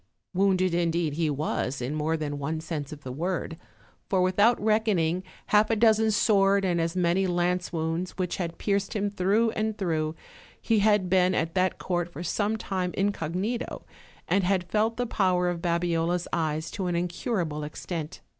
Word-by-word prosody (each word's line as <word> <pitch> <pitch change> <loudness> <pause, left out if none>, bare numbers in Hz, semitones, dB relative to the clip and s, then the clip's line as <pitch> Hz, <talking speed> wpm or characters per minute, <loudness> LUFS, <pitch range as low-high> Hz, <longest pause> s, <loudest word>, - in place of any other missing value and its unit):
Wounded 185 -1 +2
indeed 170 -2 +1
he 160 0 0
was 145 -2 -2
in 125 +4 -3
more 155 +1 0
than 145 -2 -4
one 155 +3 -2
sense 155 -3 -5
of 150 -1 -9
the 130 - -6
word; 165 +3 -3 0.5
for 190 - +2
without 205 +6 +4
reckoning 205 -6 +1 0.3
half 210 +1 +4
a 225 - +3
dozen 220 0 +4
sword 200 -2 +3
and 175 -2 +1
as 165 +1 -1
many 180 +1 +2
lance 175 0 0
womids 165 +2 -2
which 180 -2 -2
had 170 -2 -4
pierced 200 0 -1
him 205 -1 0
through 205 +4 +2
and 220 0 -2
through, 160 -5 -1 0.4
he 225 -2 +2
had 205 -2 +3
been 185 0 +3
at 165 0 -1
that 185 0 +1
court 175 -1 -2
for 175 - -7
some 205 +5 0
time 185 -4 -3
incognito, 200 +4 -2 0.4
and 195 - +2
had 180 -1 0
felt 220 +2 +1
the 245 - 0
power 185 -5 +1
of 175 -1 -3
Babiola's 170 0 0
eyes 160 -1 -1
to 190 -4 -3
an 175 - -1
incurable 175 -3 -2
extent. 155 +1 -6
180 Hz, 175 wpm, -27 LUFS, 165-200 Hz, 0.5 s, without